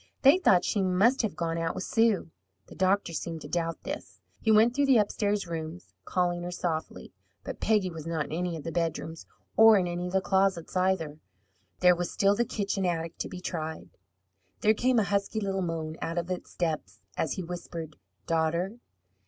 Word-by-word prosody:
They 285 +7 +7
thought 180 - +4
she 205 - +1
must 195 +8 +3
have 220 -5 -2
gone 165 -1 -2
out 165 0 -1
with 190 - -3
Sue. 225 -8 +2 0.3
The - - -13
doctor 190 0 +1
seemed 165 0 -4
to - - -8
doubt 165 -1 -2
this. - - -7 0.2
He 220 - -1
went 220 +3 +6
through 285 +1 +2
the 265 -3 +6
upstairs 205 -1 +1
rooms, 165 +1 -6
calling 175 -1 0
her 175 - -4
softly. 170 -3 -4 0.3
But - - -6
Peggy 210 -4 +2
was 160 -1 -8
not 160 -3 -1
in - - -11
any 170 +1 -2
of 155 - -8
the 165 - -4
bedrooms, 165 -1 -3 0.3
or 225 -1 +8
in 185 - +1
any 175 0 -3
of 180 - -7
the 190 - +4
closets, 190 -3 +1
either. 180 -5 0 0.6
There 180 0 +7
was 175 0 -3
still 200 0 +3
the 240 - +1
kitchen 200 -3 -2
attic 170 -2 -2
to - - -3
be 180 - -8
tried. 160 -3 -5 0.7
There 215 - +5
came 250 +3 +2
a 220 - +4
husky 200 +2 0
little 195 -2 -1
moan 165 -2 -3
out 165 +1 -3
of 175 +1 -2
its 180 - -5
depths, 150 - -3
as 160 - -1
he 185 - -4
whispered, 170 -2 -6 0.3
"Daughter!" 170 +7 0
180 Hz, 195 wpm, -28 LUFS, 165-200 Hz, 0.7 s, or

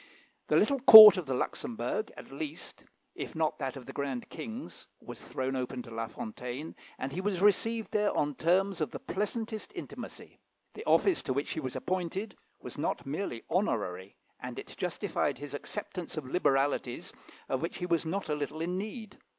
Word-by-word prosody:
The - - +3
little 280 -1 +3
court 220 -5 +13
of 180 -6 -4
the 130 - -1
Luxembourg, 235 - -3
at - - -11
least, 305 -2 -7 0.3
if - - -7
not 160 -1 0
that 135 -2 -3
of 130 - -10
the - - -9
grand 135 -4 -4
King's, 225 +4 -8
was - - -10
thrown 130 0 -3
open 125 -1 -3
to 115 - -12
La 115 0 -3
Fontaine, 125 +7 -7 0.2
and 135 +1 -4
he 185 - -2
was 195 -2 -1
received 225 +2 +2
there 210 -1 +2
on 145 0 +1
terms 185 +5 +1
of 155 - 0
the - - -6
pleasantest 215 +2 -4
intimacy. - - -9 0.3
The 435 - -9
office 380 -4 +4
to 130 - -2
which 140 +3 -2
he - - -2
was 130 -4 -5
appointed 185 +3 -3 0.2
was - - -9
not - - -2
merely 135 -4 -4
honorary, 100 - -1 0.2
and - - -7
it - - -8
justified - - -2
his 145 +1 -8
acceptance 180 +2 -6
of 155 - -3
liberalities 135 -3 0 0.3
of 130 - -1
which 165 - -3
he 180 - -3
was 170 -2 +1
not 185 +4 -3
a 150 - 0
little 150 +1 -4
in 180 +3 -1
need. 215 +1 -7
165 Hz, 185 wpm, -30 LUFS, 135-210 Hz, 0.3 s, court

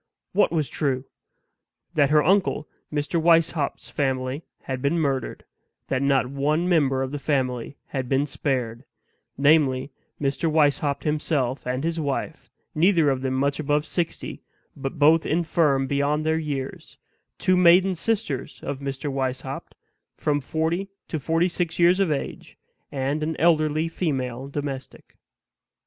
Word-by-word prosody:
"What 205 - +3
was 155 -4 0
true?" 135 -1 -1 0.9
That 145 -3 +3
her 150 0 +5
uncle 185 -4 +2 0.2
Mr. 150 +3 -1
Weishaupt's 165 -3 +2
family 130 0 -1 0.2
had 130 -1 -4
been 140 +5 +1
murdered; 135 -6 -1 0.4
that 130 -1 0
not 140 -2 +3
one 145 +6 0
member 140 -7 +2
of 130 - -4
the 145 - -4
family 130 -2 -1
had 130 -2 -3
been 135 +1 +2
spared 125 -5 -2 0.5
namely, 140 -2 +3 0.3
Mr. 145 +3 0
Weishaupt 145 -2 +2
himself 150 -5 -1
and 130 +2 -1
his 165 0 -1
wife, 150 +2 -3 0.2
neither 165 -2 +4
of 130 -1 -2
them 130 -1 -1
much 140 +2 0
above 150 0 +1
sixty, 170 0 -3 0.3
but 135 +3 -5
both 155 +3 +5
infirm 155 -4 +2
beyond 145 +3 0
their 160 0 +2
years; 140 -4 -5 0.4
two 185 - +2
maiden 180 +2 +6
sisters 180 - -2
of 140 -1 -4
Mr. 140 0 -4
Weishaupt, 130 0 -3 0.4
from 145 -1 0
forty 160 +7 -1 0.2
to 160 - -2
forty 165 +4 +1
six 175 -2 -2
years 175 +2 +5
of 190 -5 +2
age, 140 - -4 0.3
and 140 +2 -1
an 155 +1 -1
elderly 155 -1 +3
female 135 -7 -2
domestic. 140 -2 -6
145 Hz, 140 wpm, -24 LUFS, 135-160 Hz, 0.9 s, maiden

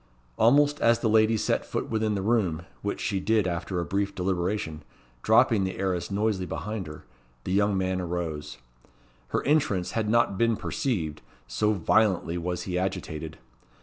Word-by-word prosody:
Almost 145 - +4
as 115 0 +5
the 115 - -1
lady 110 0 +4
set 110 - 0
foot - - -4
within 110 -1 0
the 95 - -2
room, 95 -7 +1 0.2
which 100 - -3
she 100 - -1
did 110 +1 +2
after 90 +1 -2
a 85 - -2
brief 100 +1 -1
deliberation, 90 -3 -2 0.4
dropping 105 - +4
the 95 -1 -3
arras 90 -3 -1
noiselessly 100 -2 0
behind 105 -1 -4
her, 75 0 -10 0.4
the - - -4
young 100 0 +2
man 95 0 0
arose. 85 -6 -4 0.7
Her - - -1
entrance 135 - +1
had 110 -2 -1
not 110 -4 +2
been 115 -2 +2
perceived, 80 - -2 0.2
so 85 - +1
violently 95 -2 +2
was 90 0 -3
he 90 -1 -2
agitated. 80 -5 -4
95 Hz, 160 wpm, -27 LUFS, 90-110 Hz, 0.7 s, as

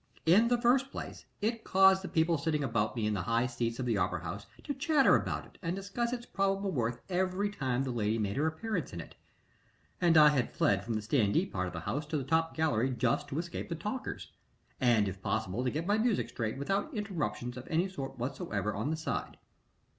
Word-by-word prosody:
In 195 +8 +6
the 245 0 +2
first 255 +3 +3
place, - - -7 0.2
it 225 +2 -1
caused 190 0 +5
the 190 - -5
people 165 -2 +2
sitting 150 -1 0
about 115 -3 0
me 115 -3 -1
in 105 - +1
the 100 - -1
high 115 +7 +1
seats 120 -2 -2
of 130 - -2
the 115 -4 +1
opera 90 -1 -1
house 100 +5 -6 0.2
to 285 - -2
chatter 285 0 +4
about - - -1
it - - -20
and 170 -1 -2
discuss 200 +5 -2
its 240 -1 -4
probable 195 -1 0
worth 120 -5 -1
every 185 +2 0
time 130 -9 -1
the 130 - -2
lady 110 -2 0
made 100 -2 -1
her 150 +3 +1
appearance 180 - -3
in 85 - -5
it, - - -9 0.9
and 170 -2 +5
I 150 -1 +9
had 135 -5 0
fled 100 -1 +2
from 115 +1 -2
the 110 - -1
standee 105 -3 +2
part 95 -1 -1
of 90 - -7
the 85 - -5
house 140 - -3
to 155 0 -1
the 140 - -2
top 160 +4 +1
gallery 135 -6 +2
just 125 -2 0
to 140 - -4
escape 170 +1 -4
the 170 - -2
talkers, 210 +10 -5 0.5
and, 115 -5 +4
if 95 0 -5
possible, 110 +2 -1
to 130 - +1
get 155 +6 -3
my 205 +3 +2
music 225 -2 +1
straight, 110 0 -3
without 195 - -1
interruptions 150 - -3
of 125 0 -8
any 170 +4 +1
sort 135 -8 -6
whatsoever 115 -5 -2
on 110 +8 -2
the 160 - -1
side. 160 - -3
145 Hz, 220 wpm, -31 LUFS, 115-190 Hz, 0.9 s, I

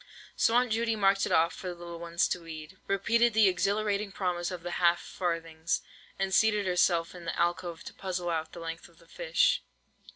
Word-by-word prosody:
So 225 - +3
Aunt 245 -1 +3
Judy 225 0 +1
marked 195 -1 +3
it - - -5
off 165 +1 +4
for 185 - -7
the 180 - -4
little 170 -1 -8
ones 170 0 +1
to 180 - -2
weed, 160 +2 -9
repeated 230 +4 +2
the 220 -2 +6
exhilarating 200 +2 0
promise 180 -3 -2
of 180 -3 -6
the 175 - -4
half 170 0 +5
farthings, 165 -2 -2 0.4
and 195 0 -1
seated 210 -1 +3
herself 175 -2 +2
in 175 -2 -10
the - - -3
alcove 175 -1 -1
to - - -9
puzzle 180 -2 -3
out 160 -1 -2
the - - -8
length 165 0 -6
of 170 - -24
the 170 - -20
fish. - - +2
180 Hz, 200 wpm, -29 LUFS, 170-200 Hz, 0.4 s, the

